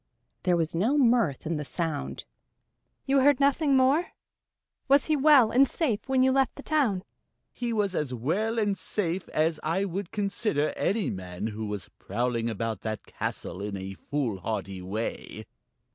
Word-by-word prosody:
There 180 Hz, -2 st, +2 dB
was 165 Hz, -1 st, 0 dB
no 220 Hz, -, +2 dB
mirth 235 Hz, -, +3 dB
in 165 Hz, 0 st, -1 dB
the 150 Hz, -, -3 dB
sound. 160 Hz, 0 st, -3 dB, 0.8 s
"You 275 Hz, 0 st, +3 dB
heard 280 Hz, 0 st, +4 dB
nothing 280 Hz, 0 st, +3 dB
more? 275 Hz, +7 st, +3 dB, 0.7 s
Was 280 Hz, 0 st, +5 dB
he 310 Hz, -, +2 dB
well 275 Hz, -5 st, +6 dB
and 270 Hz, +3 st, +5 dB
safe 245 Hz, -6 st, -2 dB
when 260 Hz, -1 st, +4 dB
you 260 Hz, -, +4 dB
left 270 Hz, 0 st, +2 dB
the 285 Hz, -, -10 dB
town?" 250 Hz, -12 st, +1 dB, 0.5 s
"He 240 Hz, -1 st, -3 dB
was 205 Hz, -4 st, 0 dB
as 150 Hz, -6 st, -1 dB
well 175 Hz, -, -1 dB
and 205 Hz, -3 st, +1 dB
safe 185 Hz, -3 st, -3 dB
as 155 Hz, 0 st, +1 dB
I 170 Hz, +6 st, 0 dB
would 190 Hz, 0 st, -4 dB
consider 200 Hz, -7 st, -1 dB
any 205 Hz, -1 st, 0 dB
man 90 Hz, 0 st, -6 dB
who 110 Hz, 0 st, -4 dB
was 105 Hz, -3 st, -5 dB
prowling 115 Hz, +2 st, -1 dB
about 110 Hz, -1 st, -3 dB
that 110 Hz, -2 st, -4 dB
castle 95 Hz, -, -5 dB
in 100 Hz, -1 st, -4 dB
a 95 Hz, 0 st, -6 dB
foolhardy 105 Hz, -6 st, -3 dB
way." 105 Hz, +5 st, -5 dB
180 Hz, 160 wpm, -27 LUFS, -, 0.8 s, well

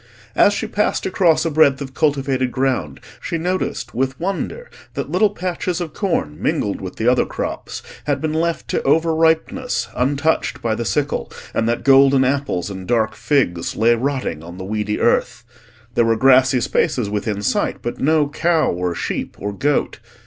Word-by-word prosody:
As 205 Hz, -, +5 dB
she 205 Hz, -, -2 dB
passed 210 Hz, -1 st, -1 dB
across 175 Hz, -4 st, +2 dB
a 165 Hz, -, 0 dB
breadth 145 Hz, -3 st, +4 dB
of 135 Hz, -2 st, -7 dB
cultivated 135 Hz, -4 st, 0 dB
ground, 130 Hz, -, -1 dB, 0.2 s
she 165 Hz, -, -3 dB
noticed, 180 Hz, +3 st, -2 dB
with 130 Hz, +2 st, -1 dB
wonder, 195 Hz, -, -3 dB, 0.3 s
that -, -, -4 dB
little 215 Hz, -, +3 dB
patches 180 Hz, -2 st, -3 dB
of 165 Hz, -4 st, -5 dB
corn 165 Hz, -, -2 dB
mingled 100 Hz, -, -1 dB
with 95 Hz, -1 st, -6 dB
the 110 Hz, -, -2 dB
other 125 Hz, 0 st, +4 dB
crops -, -, -5 dB, 0.2 s
had 145 Hz, -2 st, 0 dB
been 155 Hz, +1 st, -2 dB
left 165 Hz, +1 st, -1 dB
to -, -, 0 dB
over 160 Hz, +3 st, +2 dB
ripeness 165 Hz, +11 st, +1 dB
untouched 145 Hz, +5 st, 0 dB
by 115 Hz, -2 st, -1 dB
the 115 Hz, +2 st, -3 dB
sickle, 140 Hz, +9 st, -1 dB, 0.2 s
and 115 Hz, -, 0 dB
that 120 Hz, -, -1 dB
golden 135 Hz, -1 st, +6 dB
apples 130 Hz, -9 st, -1 dB
and 95 Hz, -1 st, -7 dB
dark 110 Hz, -2 st, +1 dB
figs 110 Hz, -, 0 dB
lay 115 Hz, +2 st, +4 dB
rotting 125 Hz, -, -2 dB
on 85 Hz, +2 st, -10 dB
the 95 Hz, -, -6 dB
weedy 105 Hz, +1 st, -2 dB
earth. -, -, +1 dB, 0.5 s
There 120 Hz, -, +3 dB
were 115 Hz, 0 st, +3 dB
grassy 130 Hz, 0 st, +5 dB
spaces 115 Hz, 0 st, 0 dB
within 105 Hz, 0 st, -3 dB
sight, -, -, -1 dB
but 120 Hz, -, -4 dB
no 155 Hz, 0 st, +3 dB
cow, 160 Hz, +2 st, +1 dB
or 90 Hz, 0 st, -2 dB
sheep, -, -, -4 dB
or 100 Hz, +1 st, -4 dB
goat. 145 Hz, +8 st, 0 dB
135 Hz, 175 wpm, -20 LUFS, 110-160 Hz, 0.5 s, golden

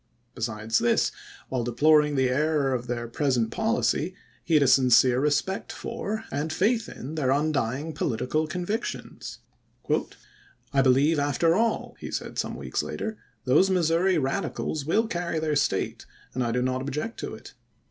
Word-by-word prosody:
Besides 110 Hz, 0 st, -1 dB
this, 120 Hz, -, +2 dB, 0.4 s
while 130 Hz, -2 st, -1 dB
deploring 150 Hz, +5 st, +4 dB
the 130 Hz, -1 st, +3 dB
error 140 Hz, +1 st, +1 dB
of 125 Hz, -1 st, -3 dB
their 120 Hz, -1 st, -3 dB
pres 130 Hz, +2 st, 0 dB
ent 115 Hz, -1 st, 0 dB
policy, 220 Hz, -6 st, 0 dB, 0.3 s
he 165 Hz, -, +1 dB
had 150 Hz, -, +6 dB
a -, -, +3 dB
sincere 125 Hz, -1 st, +5 dB
respect 150 Hz, +7 st, 0 dB
for, 220 Hz, -1 st, -4 dB
and 145 Hz, +3 st, -2 dB
faith 220 Hz, +7 st, +1 dB
in, 135 Hz, +5 st, -7 dB
their 150 Hz, -5 st, 0 dB
undying 145 Hz, 0 st, 0 dB
political 140 Hz, +3 st, -1 dB
convictions. 180 Hz, +8 st, -4 dB, 0.7 s
" -, -, -26 dB
I 135 Hz, -, +4 dB
believe 135 Hz, +4 st, +4 dB
after 145 Hz, +4 st, +2 dB
all," 225 Hz, +4 st, 0 dB
he -, -, -6 dB
said -, -, -4 dB
some -, -, -2 dB
weeks -, -, -2 dB
later, 220 Hz, -1 st, -5 dB
" -, -, -42 dB
those 150 Hz, +9 st, +4 dB
Mis 175 Hz, -4 st, +2 dB
souri 175 Hz, +1 st, +3 dB
Radicals 145 Hz, 0 st, -2 dB
will 220 Hz, +8 st, +3 dB
carry 175 Hz, -6 st, -2 dB
their 155 Hz, -1 st, 0 dB
State, 145 Hz, -, -1 dB, 0.3 s
and 130 Hz, -, -1 dB
I 120 Hz, -, 0 dB
do 125 Hz, +1 st, 0 dB
not 130 Hz, 0 st, -1 dB
object 150 Hz, -, -4 dB
to -, -, -5 dB
it. -, -, -13 dB
150 Hz, 170 wpm, -26 LUFS, 130-170 Hz, 0.7 s, had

